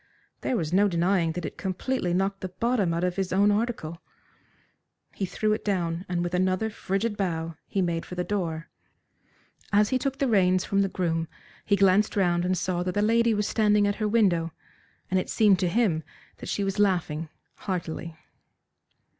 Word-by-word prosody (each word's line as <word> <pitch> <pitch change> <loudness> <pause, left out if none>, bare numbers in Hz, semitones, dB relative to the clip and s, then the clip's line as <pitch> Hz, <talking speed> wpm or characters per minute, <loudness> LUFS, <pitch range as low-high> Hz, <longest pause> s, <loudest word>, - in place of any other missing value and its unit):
There 255 - 0
was 165 -3 -2
no 200 +2 +5
denying 170 -2 +1
that 175 +1 -4
it - - -7
completely 190 +1 -2
knocked 195 +2 0
the 185 - -4
bottom 205 0 0
out 170 +1 -1
of 180 0 -1
his 190 -2 -1
own 200 +2 +4
article. 205 -7 -2 1.1
He 195 - -3
threw 215 +3 0
it 215 - -3
down, 175 -3 -1
and 175 -1 0
with 175 0 -3
another 185 +4 +1
frigid 205 +2 -2
bow 165 -4 -2
he 195 - 0
made 170 -1 -1
for 180 - -8
the 180 - -1
door. 170 -5 -3 1.0
As 210 0 +4
he 260 - +1
took 270 0 -2
the 275 - +1
reins 185 -5 +3
from 200 0 +1
the 195 - +1
groom 165 -3 -1 0.4
he 205 - +3
glanced 195 +1 +3
round 175 -3 +2
and 185 0 +1
saw 180 0 -1
that 180 +1 -2
the 205 - +2
lady 230 +1 +3
was 210 0 0
standing 210 -2 +3
at 205 0 0
her 215 - 0
window, 185 -7 +2 0.6
and 185 - +3
it - - -4
seemed 205 -4 +4
to 180 - +1
him 195 -6 +1 0.4
that - - -8
she 200 - -1
was 195 +1 -2
laughing 165 -6 +1 0.3
heartily. 170 -3 -4
185 Hz, 190 wpm, -26 LUFS, 175-205 Hz, 1.1 s, no